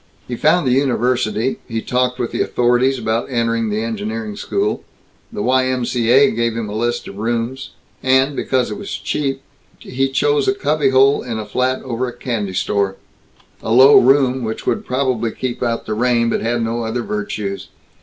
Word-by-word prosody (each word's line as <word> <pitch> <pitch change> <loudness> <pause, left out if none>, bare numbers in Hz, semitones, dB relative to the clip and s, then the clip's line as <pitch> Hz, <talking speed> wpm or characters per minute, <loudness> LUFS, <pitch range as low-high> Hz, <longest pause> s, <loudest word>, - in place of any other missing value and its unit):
He 125 - -4
found 155 +6 +2
the 130 - +2
university; 125 -2 0
he 115 -2 -3
talked 125 +2 -1
with 120 -2 -3
the - - -1
authorities 125 +2 +2
about 115 +1 -2
entering 115 -2 0
the 105 +1 -1
engineering 110 -1 -4
school; 400 - -2 0.5
the 210 -3 -4
Y. 130 0 +2
M. 130 -1 -1
C. 120 -2 -1
A. 135 +3 +6
gave 115 0 -1
him 115 -2 -3
a 105 - -6
list 120 +2 -1
of 100 - -9
rooms; 120 +4 -2 0.3
and, 130 +2 +2
because 130 -2 0
it - - -5
was 200 - -7
cheap, 135 -2 -2 0.3
he 135 +1 -2
chose 145 +1 +1
a 195 - +2
cubbyhole 140 -4 +3
in 115 -3 -5
a 110 - -4
flat 130 +4 -1
over 125 0 -2
a 120 - -8
candy 105 -7 -3
store 100 0 0 0.7
a - - -4
low 130 +4 +8
room, 130 0 +3
which 110 0 -4
would - - -1
probably 125 -3 0
keep 120 +2 -5
out 115 -1 -1
the 110 - -3
rain, 115 0 +1
but - - -1
had 115 +1 0
no 115 +1 -2
other 115 +2 -2
virtues. 105 -2 -4
120 Hz, 185 wpm, -18 LUFS, 115-130 Hz, 0.7 s, low